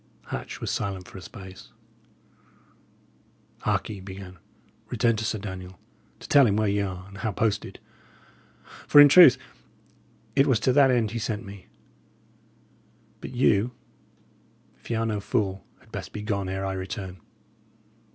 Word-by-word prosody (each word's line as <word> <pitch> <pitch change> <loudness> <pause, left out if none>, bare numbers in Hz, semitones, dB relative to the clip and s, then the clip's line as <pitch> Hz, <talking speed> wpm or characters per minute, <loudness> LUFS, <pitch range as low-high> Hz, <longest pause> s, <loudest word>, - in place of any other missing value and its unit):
Hatch - - -6
was - - -3
silent 95 -2 -3
for 95 - -10
a - - -12
space. 95 0 -11 1.9
"Hark - - -1
ye," 110 - -6
he - - -11
began, 95 -1 -10 0.5
"return 115 -1 +2
to 110 - -3
Sir 110 - -1
Daniel, 95 -3 -8 0.4
to - - -11
tell 140 -3 +6
him 100 - +1
where 110 0 +1
ye 100 0 +1
are, 95 -1 -5
and 100 +1 -12
how 110 -1 -1
posted; 105 +1 -2 1.1
for, 145 - +7
in 145 - +11
truth, 145 -3 +8 1.0
it 140 +1 +4
was 125 -5 +3
to 130 - +2
that 140 -1 +6
end 120 -5 +1
he 115 - -3
sent 110 0 -3
me. 100 -1 -11 1.5
But - - -7
you, 120 -1 +2 1.1
if - - -15
ye 115 - 0
are 115 - 0
no 110 -2 -1
fool, 100 -2 -2
had - - -23
best - - -7
be 105 - -6
gone 100 -3 -2
ere 95 +1 -3
I 95 - -2
return." 95 -1 -6
100 Hz, 160 wpm, -26 LUFS, 95-115 Hz, 1.9 s, in